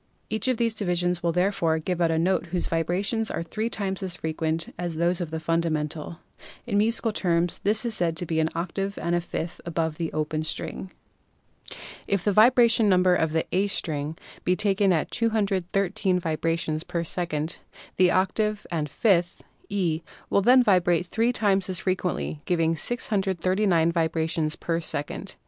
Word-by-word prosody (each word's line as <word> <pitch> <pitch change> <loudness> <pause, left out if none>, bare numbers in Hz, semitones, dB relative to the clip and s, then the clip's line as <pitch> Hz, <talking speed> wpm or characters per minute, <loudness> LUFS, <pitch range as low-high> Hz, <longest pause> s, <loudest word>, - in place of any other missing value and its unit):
Each 220 +3 0
of 255 -2 +1
these 230 -1 +1
divisions 180 -4 0
will 170 - +1
therefore 180 -2 +1
give 175 +2 -2
out 170 - +3
a 165 - +1
note 180 +2 +1
whose 175 +1 -2
vibrations 190 +7 -1
are - - -3
three 215 +6 -3
times 195 -4 -3
as 185 -2 -1
frequent 160 0 -2
as 175 -2 -4
those 170 +2 +1
of 170 - -3
the 160 0 -4
fundamental; 160 -1 -2 0.5
in 205 -4 +1
musical 225 +1 +2
terms 175 -4 0
this 215 +3 +1
note - - +1
is - - -4
said 170 -5 0
to 175 - -3
be 160 -1 -1
an 160 0 +2
octave 195 +4 -3
and 170 - -1
a 175 - +2
fifth 170 0 -5
above 165 -2 -2
the 165 -1 -2
open 155 0 -2
string. 160 +4 -3 1.2
If 200 -3 0
the 205 - +2
vibration 230 0 +5
number 185 -1 +4
of 160 -3 +1
the 160 0 0
A 195 +3 +2
string 155 -5 -3 0.3
be 180 - +2
taken 195 +1 +2
at 165 -3 0
213 195 -3 0
vibrations 160 -1 -1
per 170 -1 -3
second, 165 -2 -3 0.4
the 185 -1 +5
octave 210 +3 0
and 155 -3 -2
fifth 175 +3 +1 0.3
(E') 175 -5 0 0.3
will 200 - +4
then 250 +5 +6
vibrate 180 -5 +3
three 230 +6 +1
times 195 -5 +1
as 185 -1 -1
frequently, 180 -5 -2
giving 165 -2 +1
639 190 -4 +1
vibrations 160 -1 0
per 165 -1 -2
second. 145 -3 -5
175 Hz, 170 wpm, -25 LUFS, 165-200 Hz, 1.2 s, then